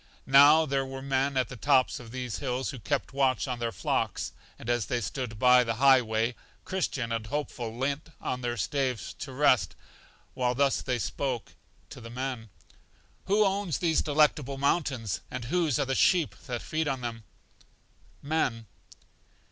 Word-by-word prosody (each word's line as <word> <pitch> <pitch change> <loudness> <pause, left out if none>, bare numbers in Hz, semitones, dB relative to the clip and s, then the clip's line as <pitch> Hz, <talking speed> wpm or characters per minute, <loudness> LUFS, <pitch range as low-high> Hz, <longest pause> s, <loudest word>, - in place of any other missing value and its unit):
Now 145 +4 +7
there 135 -2 0
were 135 0 -7
men 135 0 0
at 130 -3 +2
the - - -9
tops 130 +1 +2
of 120 -2 -11
these 125 -1 -4
hills 130 0 -2
who 135 - -8
kept 140 +3 -2
watch 130 -6 +1
on 125 -2 -3
their 115 -1 -1
flocks, - - -2 0.3
and - - -11
as 120 -2 0
they 120 - 0
stood 120 -1 -4
by 125 +2 +6
the 115 -1 -2
high 135 +1 +6
way, 110 +1 -1 0.3
Christian 140 -10 -2
and 115 -1 -2
Hopeful 120 -4 -4
leant 140 +4 -2
on 125 - -3
their 120 -1 -2
staves 130 +3 -2
to 135 - -6
rest, 130 -2 +3 0.6
while 125 -1 0
thus 140 0 +2
they 125 - -1
spoke 125 0 -3 0.4
to - - -10
the 115 - -9
men: 125 -2 -4 0.8
Who 205 +2 +3
owns 195 -5 0
these 165 -3 +2
Delectable 145 -3 +2
Mountains, 135 - 0
and 125 -2 -5
whose 160 0 +1
are 145 - +1
the 135 - -1
sheep 170 +3 +3
that 120 -2 -4
feed 155 0 -2
on 135 -3 -2
them? 115 -2 -5 1.0
Men. 140 -7 -1
130 Hz, 170 wpm, -28 LUFS, 120-140 Hz, 1.0 s, Now